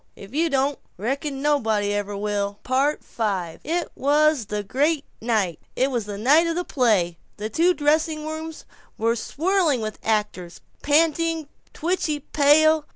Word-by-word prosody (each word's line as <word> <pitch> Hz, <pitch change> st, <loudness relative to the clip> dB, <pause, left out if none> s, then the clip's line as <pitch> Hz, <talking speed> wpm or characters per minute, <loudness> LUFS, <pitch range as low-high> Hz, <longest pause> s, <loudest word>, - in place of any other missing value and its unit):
If 195 Hz, +4 st, -12 dB
you 325 Hz, +3 st, +1 dB
don't, 275 Hz, 0 st, 0 dB, 0.2 s
reckon 275 Hz, -, -3 dB
nobody 220 Hz, -9 st, +1 dB
ever 205 Hz, 0 st, -3 dB
will." 205 Hz, 0 st, -2 dB
V 270 Hz, +4 st, 0 dB, 0.5 s
It 335 Hz, +2 st, -2 dB
was 295 Hz, -3 st, +2 dB
the 210 Hz, 0 st, -3 dB
great 285 Hz, +8 st, 0 dB, 0.2 s
night; 215 Hz, -8 st, 0 dB, 0.2 s
it 265 Hz, +2 st, +1 dB
was 235 Hz, -5 st, -2 dB
the 205 Hz, -1 st, -5 dB
night 295 Hz, +10 st, +4 dB
of 330 Hz, -, -1 dB
the 355 Hz, -, -1 dB
play. 205 Hz, -, +1 dB, 0.2 s
The 215 Hz, +1 st, -5 dB
two 350 Hz, +8 st, +3 dB
dressing 305 Hz, +1 st, +1 dB
rooms 315 Hz, +1 st, -6 dB, 0.3 s
were 230 Hz, +1 st, +1 dB
swirling 325 Hz, -, +1 dB
with 215 Hz, -1 st, -5 dB
actors, 210 Hz, -5 st, -2 dB, 0.2 s
panting, 320 Hz, +1 st, +1 dB, 0.2 s
twitchy 325 Hz, -3 st, -1 dB
pale. 305 Hz, +2 st, +3 dB
280 Hz, 145 wpm, -23 LUFS, 215-315 Hz, 0.5 s, night